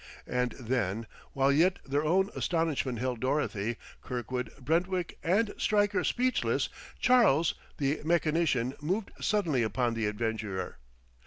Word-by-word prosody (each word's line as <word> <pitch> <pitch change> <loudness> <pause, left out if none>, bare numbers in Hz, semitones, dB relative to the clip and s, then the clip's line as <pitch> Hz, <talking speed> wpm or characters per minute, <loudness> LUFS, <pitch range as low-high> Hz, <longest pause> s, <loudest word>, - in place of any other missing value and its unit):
And 125 0 -1
then, 115 -4 -1 0.3
while 135 0 +3
yet 175 +7 +4
their 140 +2 0
own 190 +6 +2
astonishment 160 -7 0
held 125 0 -2
Dorothy, 120 -5 -1 0.2
Kirkwood, 125 0 -4
Brentwick 175 +5 -1
and 205 +5 +2
Stryker 205 -1 +2
speechless, 255 +1 +1 0.3
Charles, 195 - +4 0.2
the 140 +1 0
mechanician, 155 -6 +1
moved 190 +8 -1
suddenly 175 - +1
upon 120 +2 0
the 115 -2 -1
adventurer. 105 -3 -3
140 Hz, 115 wpm, -30 LUFS, 120-175 Hz, 0.3 s, yet